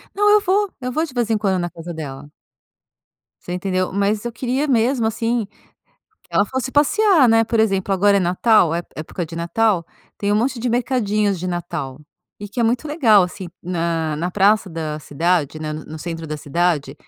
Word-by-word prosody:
Não, 415 +1 +3
eu 420 0 +6
vou, 400 +1 +1
eu 250 0 -3
vou 315 +5 0
de 295 -6 -9
vez 240 -3 -1
em 220 - +2
quando 195 -3 0
na 175 0 -3
casa 170 +1 -8
dela. 145 -2 -8 1.1
Você 175 - -6
entendeu? 185 0 -1
Mas 200 +2 0
eu - - -1
queria 260 +5 -1
mesmo, 240 -1 +2
assim, 230 0 -1 0.8
que - - -30
ela 205 - +3
fosse 260 +3 -3
passear, 340 +2 +4
né. 225 -1 +4
Por 230 0 -1
exemplo, 195 -3 +1
agora 200 +1 +4
é - - 0
Natal, 180 -1 +3
ép 170 +1 -3
época 160 +3 -5
de 165 - -10
Natal, 170 +2 0 0.3
tem 200 - -1
um 205 - +3
monte 245 +3 0
de 245 - -1
mercadinhos 215 -5 0
de 180 - -3
Natal 165 -7 -4 0.4
e 205 - -7
que 240 +5 -4
é - - +3
muito 235 +5 +1
legal, 250 - +4
assim, 180 0 -5
na 165 -3 -1
na 170 +4 -2
praça 205 +2 +3
da 160 -3 -4
cidade, 155 +1 -1
né, 155 -1 -4
no 155 +1 -7
centro 165 0 -6
da 155 0 -4
cidade. 155 +1 -1
200 Hz, 195 wpm, -20 LUFS, 170-235 Hz, 1.1 s, eu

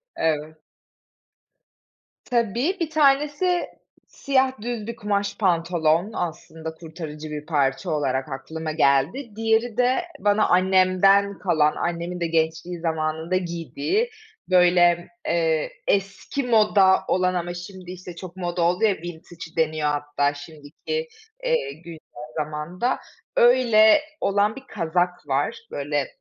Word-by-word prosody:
Evet. 155 0 -2 1.6
Tabii 240 - 0
1 325 -2 -1
tanesi 300 +4 +2 0.4
siyah 265 -4 0
düz 230 -2 -4
bir 235 - -4
kumaş 205 -2 -2
pantolon, 170 0 +1
aslında 160 -1 -5
kurtarıcı 160 -2 -8
bir 150 0 -6
parça 135 -4 0
olarak 135 -2 -1
aklıma 155 +4 -5
geldi. 160 - +1
Diğeri 225 +1 +1
de 250 +6 +3 0.2
bana 205 +1 +3
annemden 190 +2 +4
kalan, 155 -6 +2
annemin 175 +1 -3
de 170 - 0
gençliği 165 +2 -1
zamanında 160 +1 -1
giydiği, 170 - -2 0.4
böyle, 175 -1 +4 0.2
eee, 160 -2 +1 0.2
eski 195 +8 -1
moda 210 -5 +4
olan 185 0 +2
ama 175 -1 -2
şimdi 180 0 -9
işte 180 -1 -9
çok 180 0 -9
moda 175 -1 -2
oldu 175 +4 +2
ya 215 -2 +5
vintage 170 0 -10
deniyor 155 -2 +1
hatta 145 0 0
şimdiki, 155 - -6 0.4
eee, - - 0
güncel 165 +1 -11 0.4
zamanda, 155 - -2 0.4
öyle 240 +1 +6 0.2
olan 205 +2 +2
bir 270 - -10
kazak 175 -2 -1
var. 145 +11 0 0.2
Böyle. 145 -1 -2
175 Hz, 115 wpm, -24 LUFS, 160-215 Hz, 1.6 s, öyle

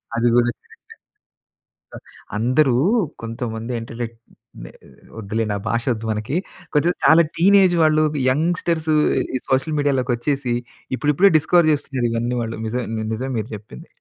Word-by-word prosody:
అది 115 +1 +1
కూడా 120 0 +4
కరక్టే. - - -11 1.6
అ - - -3
అందరూ 130 +3 +2 0.5
కొంతమంది 115 0 -5
ఇంటలెక్ట్ 115 0 -7 0.4
నె - - -10 0.5
వద్దులెండి 110 0 -2
ఆ! - - -6
భాష 115 0 0
వద్దు 110 0 -7
మనకి. 110 +7 -3 0.4
కొంచెం 160 +4 +3
చాలా 165 +1 +7
టీనేజ్ 190 0 +5
వాళ్ళు, 155 0 +3 0.3
యంగ్‌స్టర్స్ 160 +2 0 0.4
ఈ - - 0
సోషల్ 135 +4 +1
మీడియా 145 -1 +2
లోకి 125 -1 -1
వచ్చేసి 135 0 -2 0.4
ఇప్పుడిప్పుడే 150 +7 +3
డిస్కవర్ 160 +1 +3
చేస్తున్నారు 135 -4 -2
ఇవన్నీ 120 +2 -1
వాళ్ళు. 115 0 -4
నిజం 120 +2 -2 0.3
నిజం 130 +4 -4
మీరు 110 +2 -5
చెప్పింది. 100 -12 -12
125 Hz, 135 wpm, -21 LUFS, 115-155 Hz, 1.6 s, చాలా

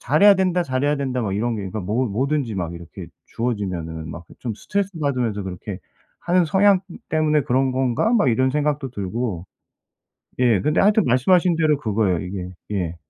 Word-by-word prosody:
'잘해야 160 +10 +6
된다, 180 -2 +1
잘해야 145 +1 0
된다' 130 -2 -2
막 100 -2 -2
이런 115 +3 -1
게 100 - -4
그러니까 100 +3 -4
뭐 110 +8 0
뭐든지 130 +1 -1
막 85 -2 -3
이렇게 85 -1 -10 0.2
주어지면은 90 -9 -3
막 85 - -8
그 - - -16
좀 115 -4 -3
스트레스 200 - -2
받으면서 125 -8 -1
'그렇게 95 +1 -6 0.4
하는 175 0 +2
성향 195 +2 +4 0.3
때문에 155 -2 +2
그런 130 0 +1
건가?' 130 - +1
막 215 - +3
이런 130 +3 +2
생각도 145 -1 -1
들고. 100 -3 -3 1.0
예 115 -6 +3
근데 150 +2 +2
하여튼 210 0 +4
말씀하신 170 +8 +3
대로 155 -3 +3
그거예요 105 - 0
이게. 90 -1 -5 0.2
예. 90 -4 -2
125 Hz, 380 characters per minute, -22 LUFS, 100-150 Hz, 1.0 s, 잘해야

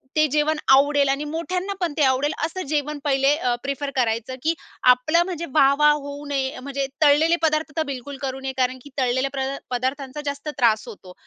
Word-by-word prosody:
ते 310 0 +4
जेवण 305 +1 +1 0.2
आवडेल 285 0 +4
आणि 275 +2 0
मोठ्यांना 360 +5 -3
पण 340 -4 0
ते 300 - +3
आवडेल, 265 +2 +2
असं 370 +3 -5
जेवण 295 0 -2
पहिले 275 0 +3
अ, 250 -6 0
प्रेफर 280 +1 -3
करायचं. 235 0 -1
की 325 +2 +2 0.4
आपलं 310 +8 +1
म्हणजे 340 -2 -4
वाह-वाह 295 +1 +5
होऊ 285 0 -6
नये 270 -2 -2
म्हणजे 275 0 -3
तळलेले 310 +3 +5
पदार्थ 310 0 +1
तर 320 - +2
बिलकुल 270 +2 -8
करू 265 -1 -3
नये, 265 0 -4
कारण 255 0 0
की 285 - -12
तळलेल्या 260 +1 +1
प्र 265 -1 -2 0.2
पदार्थांचा 260 +3 -3
जास्त 285 +1 -4
त्रास 225 -4 +2
होतो. 185 -3 -11
280 Hz, 185 wpm, -23 LUFS, 265-300 Hz, 0.4 s, वाह-वाह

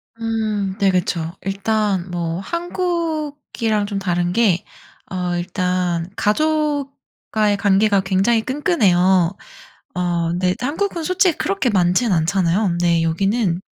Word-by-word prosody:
음 215 -4 -2
네 200 -2 +4
그쵸. 175 -2 -1
일단 195 -1 -1
뭐 170 -1 -3
한국이랑 310 - -2
좀 200 -1 -3
다른 175 -2 -1
게 200 -4 +2 0.5
어 180 -1 -2
일단 180 -1 -1
가족과의 275 -5 -1
관계가 200 0 +3
굉장히 195 +5 +2
끈끈해요. 190 - +2 0.6
어 175 -2 0
근데 180 +2 0
한국은 330 +6 -2
솔직히 365 0 +2
그렇게 195 +5 0
많지는 185 +2 +2
않잖아요. 170 +4 +1
근데 170 -1 +1
여기는 190 +3 0
195 Hz, 245 characters per minute, -20 LUFS, 180-235 Hz, 0.6 s, 네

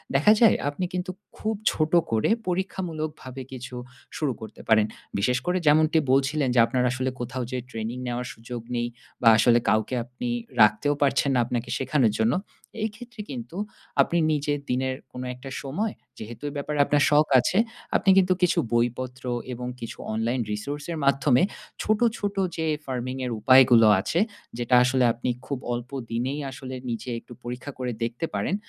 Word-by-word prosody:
দেখা 150 +10 +6
যায় 225 -4 +7
আপনি 145 +6 -3
কিন্তু 180 +1 -2 0.3
খুব 220 0 -1 0.2
ছোট 155 -1 0 0.2
করে 110 -1 +2 0.2
পরীক্ষামূলকভাবে 155 -7 -3
কিছু 130 -1 -7 0.4
শুরু 150 -4 0
করতে 110 -1 -9
পারেন। 110 -1 +5 0.3
বিশেষ 125 +5 +2
করে 180 +1 +1
যেমনটি 155 +2 +5
বলছিলেন 135 +1 +2
যে - - +5
আপনার 125 +1 0
আসলে 130 0 -1
কোথাও 125 +1 -3
যে 130 - -2
ট্রেনিং 115 0 -4
নেওয়ার 120 0 -3
সুযোগ 115 +1 -7
নেই 120 0 0 0.3
বা 120 - +3
আসলে 120 +1 +5
কাউকে 110 +4 +1
আপনি 125 - -6 0.3
রাখতেও 105 +7 +4
পারছেন 140 0 +3
না - - +3
আপনাকে 120 -1 -3
শেখানোর 130 -4 +2
জন্য। 110 +2 +3 0.5
এই 220 - +1
ক্ষেত্রে 240 -1 -9
কিন্তু 125 +5 -7 0.4
আপনি 170 - +1
নিজে 150 -1 0 0.2
দিনের 130 +1 0 0.2
কোনো 125 0 -5
একটা 125 +2 -10
সময়, 195 +11 -2 0.2
যেহেতু 115 +5 -9
এ - - -8
ব্যাপারে 150 +1 -3
আপনার 145 0 +3
শখ 150 0 +5
আছে, 175 - 0 0.4
আপনি - - +3
কিন্তু 185 -1 +5
কিছু 180 - +3
বইপত্র 125 +2 -1 0.3
এবং 125 0 -5
কিছু 115 - -6 0.2
অনলাইন 115 +3 0
Resource 140 +8 -4
এর 165 - -3
মাধ্যমে 140 +1 +4 0.4
ছোট, 215 0 +1 0.2
ছোট 205 0 -3 0.2
যে 160 - -1 0.2
ফার্মিং 130 -1 -3
এর 125 - -3
উপায়গুলো 120 -1 +7
আছে, 160 - 0 0.4
যেটা 120 +1 +2
আসলে 130 +1 +2
আপনি 120 +2 -3 0.2
খুব 140 -1 -3
অল্প 120 +1 -5 0.2
দিনেই 130 +5 -1
আসলে 130 0 -7
নিজে 115 +1 -4
একটু 120 - -14
পরীক্ষা 125 +3 -6
করে 125 -1 -2
দেখতে 120 +7 -2
পারেন, 190 - 0
130 Hz, 165 wpm, -25 LUFS, 120-150 Hz, 0.5 s, যায়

